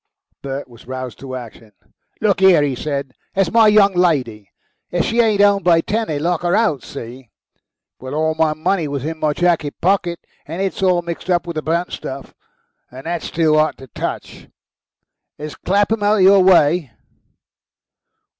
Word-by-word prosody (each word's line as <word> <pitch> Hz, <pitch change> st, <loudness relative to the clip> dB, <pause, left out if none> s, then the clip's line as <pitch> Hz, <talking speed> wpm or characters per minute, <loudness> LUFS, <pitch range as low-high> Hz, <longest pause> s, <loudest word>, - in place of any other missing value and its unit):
Bert 140 Hz, +1 st, -5 dB
was 120 Hz, -1 st, -17 dB
roused 130 Hz, -3 st, -6 dB
to 130 Hz, -1 st, -7 dB
action. 115 Hz, -3 st, -10 dB, 0.5 s
"Look 205 Hz, -3 st, +2 dB
here," 185 Hz, -6 st, +5 dB
he 140 Hz, -2 st, 0 dB
said. 140 Hz, 0 st, -4 dB, 0.2 s
"There's 190 Hz, -3 st, +1 dB
my 225 Hz, -1 st, +5 dB
young 205 Hz, -2 st, +5 dB
lady. 130 Hz, -, 0 dB, 0.4 s
If 175 Hz, -1 st, 0 dB
she 235 Hz, +1 st, -1 dB
ain't 215 Hz, -3 st, +2 dB
'ome 200 Hz, -1 st, +4 dB
by 170 Hz, -3 st, +4 dB
ten 220 Hz, +6 st, -2 dB
they 155 Hz, -, -2 dB
lock 170 Hz, +3 st, -1 dB
her 175 Hz, +1 st, +1 dB
out. 160 Hz, -, +1 dB
See? 120 Hz, +1 st, -10 dB, 0.7 s
Well, 130 Hz, +2 st, -7 dB
all 160 Hz, +1 st, +1 dB
my 155 Hz, -1 st, +1 dB
money 160 Hz, +1 st, -1 dB
was 140 Hz, -1 st, -4 dB
in 160 Hz, 0 st, -4 dB
my 155 Hz, -1 st, +1 dB
jacket 165 Hz, -3 st, 0 dB
pocket, 175 Hz, -2 st, 0 dB, 0.3 s
and 165 Hz, +4 st, -6 dB
it's 195 Hz, 0 st, -2 dB
all 180 Hz, -2 st, +2 dB
mixed 170 Hz, +2 st, -7 dB
up 175 Hz, -1 st, +1 dB
with 170 Hz, -, -5 dB
the -, -, -1 dB
burnt 170 Hz, +3 st, -1 dB
stuff, 135 Hz, +1 st, -7 dB, 0.6 s
and 130 Hz, +3 st, -12 dB
that's 170 Hz, 0 st, -3 dB
too 160 Hz, -2 st, +2 dB
'ot 155 Hz, +1 st, +1 dB
to 135 Hz, -, -12 dB
touch. 125 Hz, -, -6 dB, 0.9 s
Is 150 Hz, -1 st, -7 dB
Clapham 205 Hz, +6 st, 0 dB
out 205 Hz, +1 st, +3 dB
of 190 Hz, -, +3 dB
your 195 Hz, 0 st, +6 dB
way?" 170 Hz, -4 st, +4 dB
165 Hz, 175 wpm, -19 LUFS, 140-190 Hz, 0.9 s, your